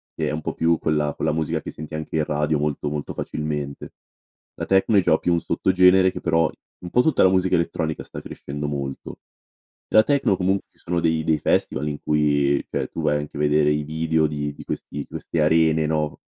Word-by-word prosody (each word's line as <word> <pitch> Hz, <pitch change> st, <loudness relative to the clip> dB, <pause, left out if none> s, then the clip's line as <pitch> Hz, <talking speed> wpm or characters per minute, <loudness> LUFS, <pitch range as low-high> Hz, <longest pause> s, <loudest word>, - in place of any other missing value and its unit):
che -, -, -1 dB
è -, -, -2 dB
un 80 Hz, -, -3 dB
po' -, -, -3 dB
più 85 Hz, 0 st, +2 dB
quella 75 Hz, -2 st, 0 dB
con -, -, -3 dB
la 80 Hz, -, +2 dB
musica 80 Hz, -1 st, -1 dB
che -, -, -7 dB
senti 75 Hz, 0 st, -8 dB
anche 80 Hz, 0 st, -4 dB
in 75 Hz, -, +2 dB
radio, 75 Hz, 0 st, 0 dB
molto, 75 Hz, 0 st, -2 dB
molto 75 Hz, -1 st, -4 dB
facilmente. 75 Hz, -2 st, -4 dB, 0.6 s
La -, -, -4 dB
techno 95 Hz, +3 st, +3 dB
è -, -, +6 dB
già 80 Hz, -3 st, +3 dB
più 85 Hz, -, 0 dB
un 85 Hz, -, +1 dB
sottogenere 95 Hz, +1 st, +4 dB
che -, -, -7 dB
però 80 Hz, -1 st, +2 dB, 0.3 s
un 90 Hz, -, -6 dB
po' 125 Hz, -, +4 dB
tutta 155 Hz, 0 st, +3 dB
la 95 Hz, -, +6 dB
musica 95 Hz, 0 st, +2 dB
elettronica 80 Hz, -2 st, -1 dB
sta -, -, -8 dB
crescendo 75 Hz, +1 st, -6 dB
molto. 70 Hz, -2 st, -5 dB, 0.7 s
La 110 Hz, -, +6 dB
techno 140 Hz, -9 st, +2 dB
comun 95 Hz, +2 st, +2 dB
ci -, -, -33 dB
sono 85 Hz, 0 st, -2 dB
dei 80 Hz, -1 st, +1 dB
dei 80 Hz, -1 st, +2 dB
festival 75 Hz, +3 st, 0 dB
in 75 Hz, -1 st, -5 dB
cui, 70 Hz, -2 st, +2 dB
cioè, -, -, -2 dB
tu 80 Hz, -, -6 dB
vai 75 Hz, -1 st, +2 dB
anche 75 Hz, 0 st, -7 dB
a -, -, -4 dB
vedere 75 Hz, 0 st, +3 dB
i 75 Hz, 0 st, +1 dB
video 80 Hz, +1 st, +1 dB
di 75 Hz, -1 st, -3 dB
di -, -, -11 dB
questi 70 Hz, 0 st, -5 dB
queste 85 Hz, -, -4 dB
arene, 80 Hz, 0 st, +3 dB
no. 75 Hz, -1 st, -2 dB
80 Hz, 215 wpm, -23 LUFS, 75-85 Hz, 0.7 s, è